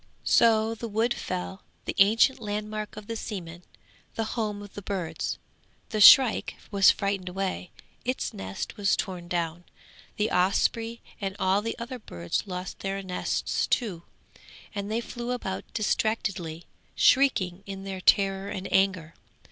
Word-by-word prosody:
So 225 -1 +4
the 230 +1 -6
wood 225 +3 +1
fell, 185 +1 -5 0.2
the - - -2
ancient 225 +7 +5
landmark 210 0 -4
of 210 - -8
the 230 +2 -4
seaman, 175 -6 -6 0.5
the 225 - 0
home 210 -3 -2
of 205 - -12
the 205 - -7
birds. 190 -4 -3 0.5
The 215 -2 -1
shrike 260 +1 +8 0.2
was 200 -1 +6
frightened 200 -3 0
away; 185 -1 -3 0.3
its 255 +1 -2
nest 95 - -6
was 200 -2 +2
torn 180 -3 -4
down; 170 -1 -2 0.5
the 210 +1 0
osprey 225 +5 +1 0.2
and 195 -1 -3
all 190 +1 +2
the 230 +2 -4
other 245 +2 -6
birds 85 - -4
lost 180 0 -5
their 195 0 -3
nests 180 -1 -1
too, 200 -9 0 0.7
and 200 0 -4
they 230 +2 0
flew 240 +1 -4
about 190 -6 -5
distractedly, 200 -7 -1 0.3
shrieking 195 -10 +3
in 195 0 -6
their 190 -1 -5
terror 195 +1 +3
and 190 -1 -4
anger. 185 -4 +2
200 Hz, 145 wpm, -27 LUFS, 185-220 Hz, 0.7 s, shrike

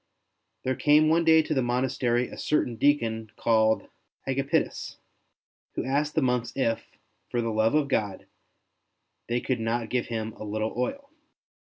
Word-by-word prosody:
There 130 - 0
came 150 +3 +4
one 165 +1 +3
day 160 -1 +6
to 155 - -2
the 135 - +1
monastery 125 0 0
a - - -10
certain 125 -5 0
deacon 115 -5 +1
called 110 -1 +2 0.4
Agapitus, 135 +1 -1 0.8
who - - -2
asked 145 +3 0
the - - +2
monks 125 -2 0
if, 115 -4 -2 0.3
for 120 - -1
the 115 -1 -1
love 110 +4 +2
of 150 -2 +2
God, 105 -8 -1 1.0
they 120 +1 +1
could 125 -1 -1
not 115 0 -1
give 125 -1 0
him 110 -1 -3
a - - -9
little 110 +1 -2
oil. 280 - -3
120 Hz, 155 wpm, -27 LUFS, 115-140 Hz, 1.0 s, day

